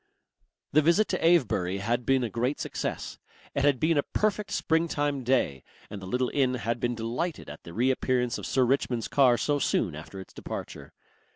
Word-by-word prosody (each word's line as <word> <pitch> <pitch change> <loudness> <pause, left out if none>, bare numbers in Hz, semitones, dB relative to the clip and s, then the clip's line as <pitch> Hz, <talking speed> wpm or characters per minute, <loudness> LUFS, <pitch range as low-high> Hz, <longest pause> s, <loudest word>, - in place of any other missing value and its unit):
The 155 - +5
visit 170 +8 +3
to 185 - -1
Avebury 110 - +3
had 115 +4 -1
been 135 -1 +3
a 120 - -1
great 125 +6 -1
success. - - -4 0.3
It 140 - 0
had 140 -3 +3
been 160 -1 +3
a - - +4
perfect 210 +5 -1
springtime 145 -4 0
day, 115 - +1 0.3
and 105 -2 -6
the 95 - -8
little 125 +5 0
inn 130 -3 +2
had 120 -1 -2
been 120 +1 -1
delighted 120 +9 -3
at - - -11
the 85 - -9
reappearance 125 0 +1
of - - -6
Sir 130 - +2
Richmond's 125 -2 0
car 130 -4 +4
so 145 +3 0
soon 95 - +1
after 80 +6 -9
its 95 - -11
departure. - - -7
130 Hz, 185 wpm, -28 LUFS, 115-145 Hz, 0.3 s, The